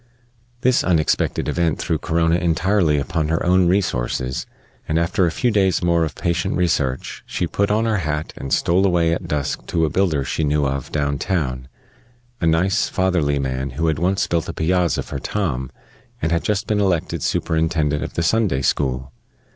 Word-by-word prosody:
This 130 0 +3
unexpected 80 -4 +1
event 85 -4 0
threw 80 -3 -1
Corona 80 +1 +1
entirely 85 -1 +2
upon 80 +2 -1
her 80 +1 0
own 90 0 +4
resources; 65 -8 -1 0.4
and, 80 - 0
after 85 +2 +2
a - - -1
few 120 +8 0
days 95 -4 +2
more 85 -1 +3
of 80 - -3
patient 85 0 -1
research, 70 -7 -1
she 90 - -2
put 100 +4 0
on 110 +2 +2
her 110 -2 +1
hat, 75 -3 -3
and 70 - -7
stole 90 +3 +2
away 85 -2 +2
at 85 +1 -4
dusk 75 -3 -2
to 80 -2 +1
a 75 - -2
builder 85 -7 +1
she 80 - -2
knew 75 0 +1
of 70 -1 -3
down 70 -2 -1
town 65 -9 -2 0.7
a 85 - +1
nice, 90 +5 +2
fatherly 90 -6 +1
man 65 0 -2
who 80 - 0
had 80 -2 +1
once 95 +3 +1
built 85 -2 -1
a - - -3
piazza 90 +1 +1
for 70 - -6
Tom 70 -8 -2 0.5
and 80 - -1
had 85 0 +1
just 105 -1 0
been 105 -1 0
elected 95 -5 0
superintendent 80 -2 0
of - - -7
the 85 - 0
Sunday 90 -7 +1
school. 65 -1 -1
80 Hz, 180 wpm, -21 LUFS, 75-90 Hz, 0.7 s, own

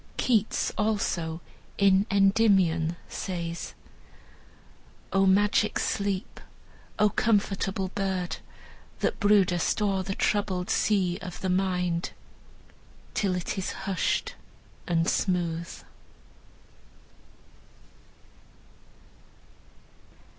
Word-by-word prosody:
Keats, 220 -4 +1
also, 175 -6 -1 0.4
in 200 +1 +4
"Endymion," 195 -5 +3
says: 170 -2 -5 1.4
"O 195 0 +4
magic 205 +2 +3
sleep! 200 +1 -2 0.6
O 210 - +4
comfortable 195 -3 0
bird 190 -2 -2 0.6
That - - 0
broodest 200 -5 +3
o'er 200 -2 +1
the 195 +1 -4
troubled 195 -3 0
sea 185 -4 +1
of 180 -1 -7
the 190 - -1
mind 180 -2 0 1.0
Till 195 -3 0
it 180 +2 -3
is 190 - -3
hushed 195 -2 -1 0.5
and 165 -1 +1
smooth." 170 -2 -1
190 Hz, 75 wpm, -27 LUFS, 180-200 Hz, 1.4 s, in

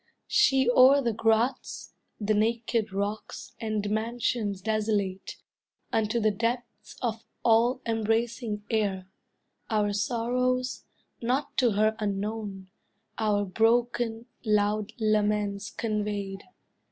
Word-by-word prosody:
She 270 -11 +4
o'er 255 +3 +7
the 235 -4 0
grots, 225 +4 0 0.3
The 215 0 +1
naked 225 0 0
rocks, 200 +2 -4
and 215 -2 -1
mansions 220 -2 -1
desolate, 210 -3 -1 0.6
Unto 220 +1 +1
the 215 -1 +3
depths 235 +3 -3
of 225 -2 -2 0.2
all 240 +3 +4
embracing 225 -1 -1
air, 200 -4 0 0.6
Our 210 -2 +1
sorrows, 250 +4 0 0.4
not 255 +5 -1
to 245 -4 +3
her 215 +2 +2
unknown, 200 -2 -3 0.5
Our 205 -2 +1
broken, 230 +2 +1 0.2
loud 210 -1 +1
laments 210 -2 +1
conveyed. 205 -3 -3
220 Hz, 100 wpm, -28 LUFS, 205-235 Hz, 0.6 s, o'er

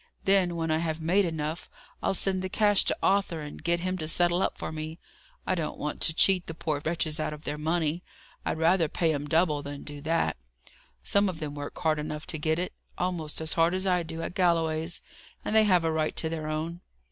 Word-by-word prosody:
Then, 190 -3 +3
when 165 -1 -1
I 155 - +2
have 160 -1 -1
made 180 +5 +3
enough, 160 0 -3 0.3
I'll - - +1
send 190 0 +2
the 185 - -3
cash 205 +1 +3
to - - 0
Arthur, 195 -5 +2
and 150 -1 -8
get 170 0 +1
him 185 +1 -1
to 155 - -3
settle 175 +2 +3
up - - 0
for - - -4
me. 155 +1 -5 0.5
I - - +1
don't 165 -4 -2
want 150 0 -4
to 160 - +3
cheat 185 -1 +4
the 165 - -6
poor 155 -3 -2
wretches 160 -1 -1
out 155 - -1
of 150 0 -10
their 150 +1 -3
money; 160 +1 0 0.4
I'd - - -1
rather 165 +1 +4
pay 165 0 +1
'em 145 0 -3
double 160 -2 +2
than 145 0 -7
do 145 -1 -8
that. 165 +3 +1 0.7
Some 200 - +3
of 170 -4 -6
them 150 -2 -4
work 145 0 -6
hard 155 -3 +1
enough 150 0 -4
to 160 - -3
get 155 +1 +1
it: 180 +1 -2 0.2
almost 170 -4 -2
as 160 - 0
hard 165 +2 +3
as 185 +1 0
I 180 -2 +3
do 165 0 -5
at - - -4
Galloway's; 165 -2 +1 0.4
and 215 - -1
they 220 0 +7
have 180 -4 +4
a 165 - +2
right 155 -1 0
to 160 - -1
their 160 -1 -3
own. 160 +3 -3
165 Hz, 230 wpm, -28 LUFS, 155-180 Hz, 0.7 s, they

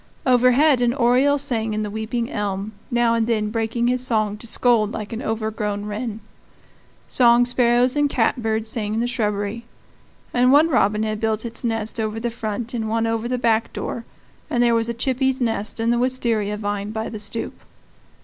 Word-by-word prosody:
Overhead 255 +2 +4
an 240 0 +2
oriole 265 +3 +3
sang 225 -6 -1
in 215 - -1
the 210 - -4
weeping 220 +2 -3
elm, 200 0 -3 0.2
now 240 -1 +2
and 230 -1 +1
then 215 -2 0
breaking 225 +1 -1
his 250 +1 +1
song 215 -4 0
to 235 - -9
scold 225 -3 +2
like 210 +1 -5
an 225 - -4
overgrown 215 -2 -3
wren. 215 +1 -5 0.9
Song 240 -1 +4
sparrows 245 +1 +3
and 290 -1 +2
catbirds 225 -3 0
sang 215 -1 -3
in - - 0
the 235 - +1
shrubbery; 210 -2 -2 0.7
one 265 +6 +4
robin 215 -6 +2
had 215 -1 -2
built 220 0 -1
its 235 +2 -4
nest 225 -1 -2
over 220 0 -2
the 235 +1 -2
front 225 +1 -4
and 220 -2 -2
one 225 +1 0
over 225 0 -1
the 250 +1 -1
back 230 -2 +1
door, 235 - -4 0.5
and 240 0 +2
there 235 -1 +3
was 230 0 +1
a 235 - -3
chippy's 265 +2 0
nest 225 -3 -1
in 230 +1 +1
the 240 - +1
wistaria 235 -5 0
vine 205 -1 -3
by 220 +1 -4
the 215 - -6
stoop. 210 +2 -4
230 Hz, 185 wpm, -22 LUFS, 215-245 Hz, 0.9 s, Overhead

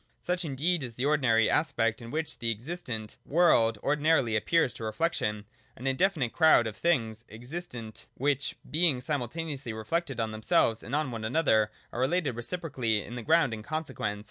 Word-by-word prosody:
Such 180 +1 -2
indeed 160 +3 0
is 120 -4 -6
the 125 - -2
ordinary 130 -7 +3
aspect 120 -8 +1
in 115 - -8
which 160 +4 -3
the 115 - 0
existent 115 -2 -4
world 120 -9 +4
originally 145 -5 +2
appears 135 +4 +2
to - - -8
reflection, 110 -4 -1 0.2
— - - -35
an 125 - -9
indefinite 135 -2 +1
crowd 160 -7 +5
of 110 -2 -4
things 115 -10 0
existent, 120 - -8
which 140 +1 0
being 155 -4 +3
simultaneously 140 -1 -3
reflected 135 +6 -2
on 110 -1 -1
themselves 110 +1 +2
and 130 - -4
on 150 -3 0
one 115 -2 -5
another 110 -4 +2 0.2
are - - -4
related 135 0 +1
reciprocally 120 - -1
as 120 0 -6
ground 155 -2 +3
and 110 -1 -6
consequence. 150 -8 -3
130 Hz, 165 wpm, -29 LUFS, 115-160 Hz, 0.2 s, crowd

